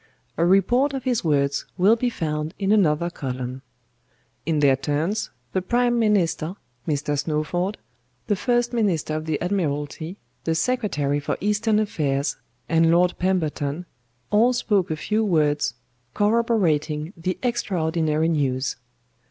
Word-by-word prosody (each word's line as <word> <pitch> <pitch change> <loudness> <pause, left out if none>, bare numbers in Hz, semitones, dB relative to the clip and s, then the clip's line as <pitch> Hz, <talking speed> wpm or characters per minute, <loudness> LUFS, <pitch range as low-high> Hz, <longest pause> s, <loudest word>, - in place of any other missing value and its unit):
A 165 - +1
report 240 +10 +3
of 265 - -4
his 250 -3 0
words 145 -2 +1
will 195 +5 +5
be 245 +1 0
found 155 -5 -3
in 195 0 0
another 170 -5 +3
column. 130 -3 -5 0.9
In 160 -2 +1
their 140 -2 +5
turns, 155 +10 -1 0.2
the 185 - +1
PRIME 240 +4 +1
MINISTER, 190 -5 +1 0.3
Mr. 145 -1 0
SNOWFORD, 165 +7 -1 0.5
the 210 - +1
FIRST 240 +4 0
MINISTER 190 -10 0
OF 155 0 -3
THE 155 -2 0
ADMIRALTY, 160 -1 -2 0.3
THE 160 +2 0
SECRETARY 160 - 0
FOR 140 - -2
EASTERN 210 +2 +1
AFFAIRS, 150 -9 0 0.3
and 165 0 +3
LORD 175 +2 +4
PEMBERTON, 170 -3 -1 0.5
all 230 +4 +4
spoke 205 -6 +1
a 160 - -1
few 215 +8 0
words, 150 - +1 0.4
corroborating 190 -8 +1
the 180 +1 -3
extraordinary 160 -9 0
news. 135 -4 0
170 Hz, 130 wpm, -23 LUFS, 150-210 Hz, 0.9 s, will